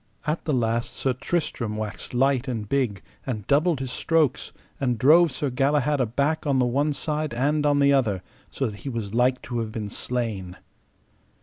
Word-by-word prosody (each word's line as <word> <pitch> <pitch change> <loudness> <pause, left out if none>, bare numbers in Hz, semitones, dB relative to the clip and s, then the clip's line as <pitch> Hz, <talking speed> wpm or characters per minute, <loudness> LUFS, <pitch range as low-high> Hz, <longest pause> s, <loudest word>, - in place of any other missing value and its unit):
At 155 +1 -2
the 155 - 0
last 115 -1 0
Sir 130 - 0
Tristram 125 -6 -2
waxed 110 +3 -5
light 135 +1 +2
and 115 -5 -3
big, 120 -7 0 0.2
and 110 -6 -4
doubled 155 +1 +2
his 130 -2 -4
strokes, 155 -4 +1 0.3
and 125 -3 0
drove 160 +7 +6
Sir 135 +1 -2
Galahad 140 +2 +2
aback 140 +7 0
on 140 -2 +2
the 125 - +3
one 140 +5 +1
side 150 -2 -2
and 145 +4 +1
on 145 -1 +3
the 140 0 +4
other, 105 -9 +1 0.3
so 135 - -2
that 105 -4 -5
he 140 - -5
was 110 -5 -4
like 125 +2 +2
to 120 -1 -3
have 110 -1 -3
been 110 -2 -4
slain. 110 -7 -3
130 Hz, 185 wpm, -25 LUFS, 115-145 Hz, 0.3 s, drove